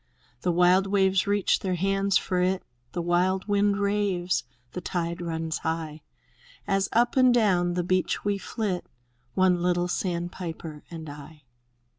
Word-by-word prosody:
The 180 - +1
wild 180 +3 +4
waves 190 -1 +2
reach 205 -1 +2
their 185 -2 -1
hands 195 +2 +2
for 180 -2 -1
it. 185 +1 +1 0.3
The 175 - -2
wild 180 +3 +1
wind 205 0 +2
raves, 200 -3 0 0.3
the 180 - -5
tide 170 0 -3
runs 160 -1 -3
high. 160 -1 -3 0.7
As 195 0 +1
up 240 +1 +2
and 255 -1 +6
down 185 -7 +2
the 180 - 0
beach 185 +2 0
we 200 -1 0
flit, 195 -2 -3 0.3
— 120 0 -42
One 185 -2 +3
little 175 0 +1
sandpiper 170 -3 -4
and 160 -2 -8
I. 145 +1 -11
180 Hz, 150 wpm, -26 LUFS, 170-195 Hz, 0.7 s, and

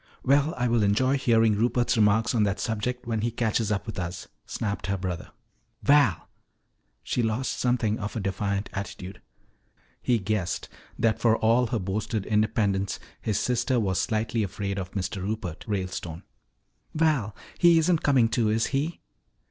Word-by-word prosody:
Well, 145 +4 +3
I 125 0 +1
will 120 -1 +2
enjoy 115 +7 +3
hearing 115 -5 +3
Rupert's 120 +3 +1
remarks 110 +2 +3
on 115 - +2
that 100 -1 +1
subject 125 +2 -2
when 115 -2 -1
he 120 - +1
catches 110 -2 0
up 100 - -1
with 110 -4 -5
us," 90 0 -5 0.2
snapped 100 -3 -3
her 100 0 0
brother. 90 -2 -4 0.5
"Val!" 140 - +4 0.8
She 125 - -1
lost 115 +3 -1
something 120 -4 +1
of 105 0 -5
her - - -1
defiant 100 +1 -2
attitude. 95 -1 -6 0.8
He 120 - +2
guessed 100 -3 -2 0.3
that 115 -1 +1
for 115 -1 +3
all 115 +2 +3
her 115 - -1
boasted 100 +2 -2
independence 105 -2 +1 0.2
his 105 -3 0
sister 125 +1 +1
was 95 -4 0
slightly 110 +1 -1
afraid 100 0 -3
of 95 0 -6
Mr. 100 0 -3
Rupert 95 -4 -4
Ralestone. 90 -5 -4 0.7
"Val, 150 -10 +1 0.2
he 170 -1 +6
isn't 165 0 +3
coming, 130 -5 +4
too, 115 -1 +1
is 110 +1 +2
he?" 150 +5 -1
110 Hz, 155 wpm, -26 LUFS, 100-120 Hz, 0.8 s, he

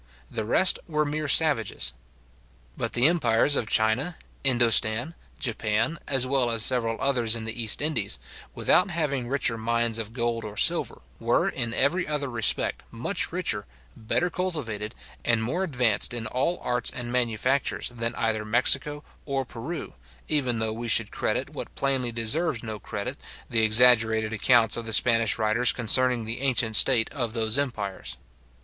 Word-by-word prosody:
The 110 - -4
rest 185 - +3
were 150 -2 -1
mere 150 +1 -4
savages. 135 - +2 0.8
But - - -4
the 120 - +2
empires 145 -4 +2
of 110 - -2
China, 120 +10 0 0.3
Indostan, 120 +1 +3 0.3
Japan, 115 +4 -2
as 130 -2 +1
well 130 -2 +1
as 115 -1 +3
several 115 -3 +1
others 120 -5 +1
in 115 -1 -5
the 115 +2 -5
East 110 +5 +2
Indies, 115 - 0 0.4
without 185 - +2
having 145 -7 -2
richer 125 -3 -1
mines 115 0 -1
of 110 -1 -5
gold 115 -1 -3
or 105 -1 -9
silver, - - +2 0.2
were, - - 0
in 115 -1 -3
every 155 +10 0
other 145 -3 -2
respect, 115 -3 +1
much - - -2
richer, - - -2 0.3
better 170 +10 -2
cultivated, 125 - -4 0.3
and 115 -2 +1
more 165 +11 -2
advanced 125 - +1
in 115 -2 -5
all 130 +10 -2
arts 125 -1 -1
and 120 -1 -7
manufactures, 125 +2 -1
than 115 -1 -4
either 110 -1 -2
Mexico 140 +6 +3 0.2
or 135 -2 -2
Peru, 125 +8 -8 0.3
even 130 -6 0
though 110 -1 -1
we 120 +1 -7
should 115 -1 +2
credit, - - -2
what - - -9
plainly 135 -3 0
deserves 115 +4 0
no 110 -1 -6
credit, - - -6 0.3
the 115 - +2
exaggerated 110 -1 +4
accounts 115 +1 +3
of 115 -1 -5
the 110 - 0
Spanish 115 -1 +4
writers 110 +2 +2
concerning 120 +1 +1
the 115 +3 -5
ancient 125 -5 +1
state 115 0 +5
of 120 -5 -3
those 110 -1 +2
empires. 100 - -4
120 Hz, 155 wpm, -25 LUFS, 110-135 Hz, 0.8 s, state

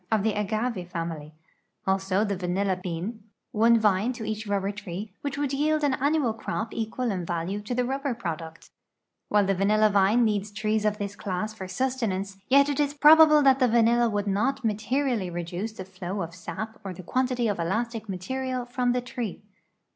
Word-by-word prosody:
of 215 -3 +2
the 220 -1 +1
agave 210 -2 -2
family; 165 -3 -5 0.5
also, 190 +1 +1
the 200 -2 -1
vanilla 185 +2 0
bean, 185 +5 -5 0.3
one 230 +2 +5
vine 210 +1 +2
to 235 -3 -6
each 220 0 -4
ru])ber 200 -1 0
tree, 200 0 -6
which 280 -1 -3
would 285 -2 -1
yii'ld 305 +2 +1
an 285 -2 +3
annual 280 -3 +1
crop 220 0 -4
equal 230 +2 -2
in 185 -3 -2
value 175 +4 -3
to 215 +4 -4
the 250 - +1
rubl)er 270 0 -2
product, 165 -5 -6 0.6
^\'hile 205 -1 +4
the 195 - +2
vanilla 210 +3 +3
vine 205 +4 +4
needs 210 -1 0
trees 215 0 -1
of 210 0 +1
this 205 -1 -4
class 205 +2 -3
for 190 -4 -7
sustenance, 200 -3 -2
yet 280 +2 +5
it 290 0 -1
is 290 0 +1
])robable 305 0 +7
that 270 -1 +5
the 255 - +4
vanilla 235 0 +4
would 205 -1 -1
not 235 +7 0
materially 225 -1 0
reduce 175 +5 -4
the 190 -3 -8
flow 190 +1 -5
of 170 0 -7
sap 190 +6 -6
or 190 -2 -6
the 185 - -10
quantity 250 +3 0
of 205 -4 -1
elastic 220 +5 -2
material 255 +7 -3
from 245 0 0
the 250 - 0
tree. 240 -5 -5
215 Hz, 185 wpm, -26 LUFS, 190-245 Hz, 0.6 s, robable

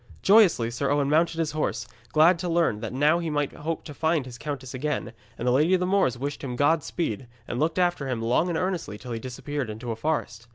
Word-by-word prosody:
Joyously 190 - +5
Sir 135 +3 -1
Owen 145 0 +1
mounted 165 +1 +2
his 165 -2 0
horse, 155 0 -2 0.3
glad 165 +3 +5
to 175 0 -3
learn 165 -10 +2
that - - -5
now 150 +6 +3
he 170 -2 -3
might 145 -2 -1
hope 160 +2 -4
to 150 - -9
find 160 -1 0
his 120 -2 -10
countess 135 -4 -5
again, 130 -3 -3 0.2
and 120 - -3
the - - +4
Lady 155 +8 +4
of - - +1
the 180 - 0
Moors 185 -10 +2
wished 140 +3 -4
him 125 -3 -4
Godspeed, 145 - 0 0.2
and 120 - -3
looked 160 +3 0
after 175 -6 +1
him 125 -3 -1
long 120 +10 +1
and 170 - -1
earnestly 180 - -2
till 125 +2 -9
he 115 - -3
disappeared 130 +2 -4
into 115 +3 -5
a - - -2
forest. 115 -4 -3
145 Hz, 235 wpm, -26 LUFS, 125-165 Hz, 0.3 s, Joyously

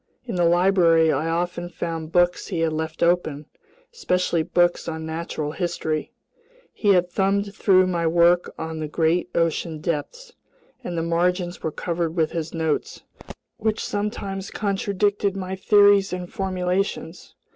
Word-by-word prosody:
In 235 - -5
the 175 -2 +2
library 170 -2 +4
I 155 +4 -1
often 175 +1 -2
found 165 -2 -5
books 175 0 +2
he 175 -5 -2
had 160 -1 +1
left 160 +1 -3
open, 170 -4 +1 0.5
especially 180 - 0
books 175 +2 +1
on 160 -1 -4
natural 160 -2 -4
history. 160 -3 -3 0.6
He 205 -2 +3
had 180 0 +2
thumbed 200 +1 0
through 185 -3 +4
my 170 -2 0
work 170 +1 +3
on 160 0 -5
the 155 - -3
great 165 +3 +1
ocean 165 -1 0
depths, 180 - -4 0.5
and 175 - -4
the 165 - 0
margins 175 +1 0
were 160 - -2
covered 170 0 -3
with 160 -3 +1
his 165 -1 -4
notes, 160 -2 -2 0.5
which 220 0 -1
sometimes 200 -1 -3
contradicted 200 0 -1
my 190 0 -4
theories 200 0 +4
and 180 -1 -5
formulations. 185 -2 -2
175 Hz, 145 wpm, -23 LUFS, 165-190 Hz, 0.6 s, library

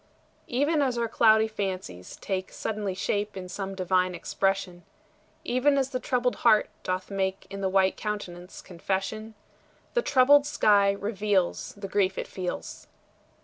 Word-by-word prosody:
Even 290 +5 +1
as 255 -3 0
our 235 0 0
cloudy 220 -1 +4
fancies 185 - -5
take 190 -1 -4
Suddenly 210 -3 -3
shape 205 +1 -2
in 185 -1 -6
some 195 +1 -5
divine 185 -1 +1
expression, 195 0 -2 0.6
Even 275 +3 +2
as 270 0 0
the 255 - -2
troubled 250 -1 0
heart 220 -3 +4
doth 185 +1 -3
make 190 -1 -2
In 195 0 -6
the 190 - 0
white 190 0 +2
countenance 185 -4 -6
confession, 195 +5 -4 0.6
The 485 - +2
troubled 285 - +5
sky 205 -8 +4
reveals 200 -2 -1
The 200 -1 -6
grief 190 -1 +1
it - - -2
feels. 180 -2 -6
200 Hz, 145 wpm, -27 LUFS, 190-225 Hz, 0.6 s, troubled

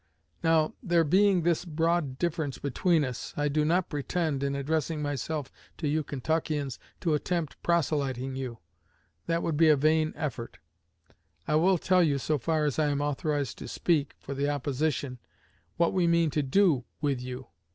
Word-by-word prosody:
Now, 160 -1 +3
there 175 -6 +3
being 185 +3 +4
this 170 -1 +1
broad 165 -4 0
difference 155 -4 -2
between 155 +3 +1
us, 125 -2 -6
I 145 0 +1
do 150 +1 +1
not 170 +4 +2
pretend, 150 0 -2
in 140 0 -1
addressing 155 +2 -1
myself 145 0 -3 0.3
to 155 - -2
you 155 +2 +1
Kentuckians, 145 -1 -2 0.2
to 165 -3 +1
attempt 160 0 -2
proselyting 140 -6 0
you; 130 -3 -5 0.7
that 165 0 0
would 160 -3 -1
be 160 0 +6
a 150 - +6
vain 155 +2 +2
effort. 140 -6 -5 0.9
I - - 0
will 180 +5 +4
tell 180 +2 +3
you, 150 -5 +3
so 150 +2 0
far 155 +3 0
as 145 0 -1
I 155 - +3
am 145 -1 0
authorized 145 -2 -1
to - - -7
speak 150 -5 0
for 140 - -7
the 140 +1 0
opposition, 145 -2 -1 0.6
what 170 0 +2
we 180 -2 +2
mean 170 -2 +3
to 150 - +1
do 145 -1 +3 0.2
with 140 -4 0
you. 125 +1 -7
150 Hz, 170 wpm, -28 LUFS, 140-165 Hz, 0.9 s, be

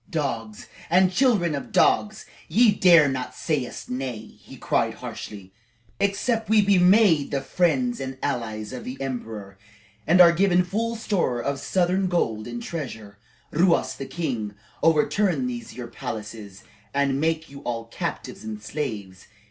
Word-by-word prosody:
"Dogs 115 - -3 0.2
and 185 +1 +4
children 210 - +3
of 140 - -5
dogs, 210 0 +2 0.2
ye 235 -1 +5
dare 170 -6 +6
not 130 -2 -3
say 150 -6 -1
us - - -9
nay!" 125 -3 -4 0.2
he - - -13
cried - - 0
harshly. 95 -3 -8 0.5
"Except 215 +3 0
we 220 0 +5
be 200 -2 +4
made 180 -5 +5
the 140 - -1
friends 235 - 0
and 130 0 -5
allies 110 -5 -3
of 125 - -6
the 130 +2 -7
emperor, 110 -7 -6 0.5
and 175 +3 +5
are 175 -1 +9
given 180 +1 +3
full 225 +6 -2
store 190 - -1
of 140 +3 -2
southern 185 +4 +1
gold 115 -12 -1
and 240 -1 -6
treasure, 110 - -7 0.3
Ruas 170 +2 +2
the 135 - -7
king 130 -11 -3
shall 115 +9 0
overturn 190 +8 +1
these 240 -2 -5
your 125 - -6
palaces, 105 -3 -7 0.3
and 140 -1 +1
make 160 -1 -1
you 140 - -9
all 115 -3 -4
captives 115 - -5
and 110 -1 -6
slaves. 105 -6 -5
150 Hz, 155 wpm, -24 LUFS, 115-185 Hz, 0.5 s, are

